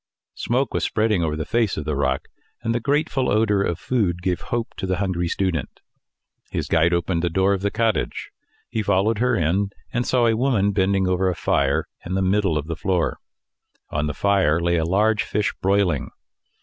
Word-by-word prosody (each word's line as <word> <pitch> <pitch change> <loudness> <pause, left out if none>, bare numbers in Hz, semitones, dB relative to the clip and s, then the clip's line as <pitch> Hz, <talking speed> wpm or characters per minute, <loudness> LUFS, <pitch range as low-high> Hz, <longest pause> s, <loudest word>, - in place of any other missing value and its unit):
Smoke 130 +3 -1
was - - -1
spreading 110 -4 +1
over 75 -2 -1
the 80 -1 -3
face 115 -5 0
of 75 - -4
the 75 -1 -1
rock, 65 -1 -1 0.4
and 115 0 0
the 120 - 0
grateful 140 0 0
odour 105 -2 +2
of 85 -4 -1
food 90 -9 -1
gave 90 -2 -1
hope 120 -1 -3
to 95 - -3
the 95 - +1
hungry 90 -3 -1
student. 90 -3 -2 0.7
His - - -3
guide 80 +2 +3
opened 85 0 0
the 85 - 0
door 95 +4 +2
of 95 - -2
the 100 - +1
cottage; 110 0 -1 0.4
he 110 - -2
followed 100 +2 +1
her 125 0 +2
in, 95 +4 +1 0.2
and 120 - +1
saw 125 -1 +2
a 115 -1 +3
woman 110 -5 +2
bending 95 -1 +1
over 95 +1 +1
a 90 - -2
fire - - +1 0.2
in 90 +2 -3
the 95 - +1
middle 95 -3 +2
of 75 - -3
the 85 +1 -4
floor. 90 0 -1 0.7
On 75 +1 -1
the 75 - -4
fire 95 -6 +2
lay 85 0 +1
a 80 - 0
large 105 +4 +2
fish 105 +1 -1
broiling. 95 -7 +1
95 Hz, 200 wpm, -22 LUFS, 85-110 Hz, 0.7 s, guide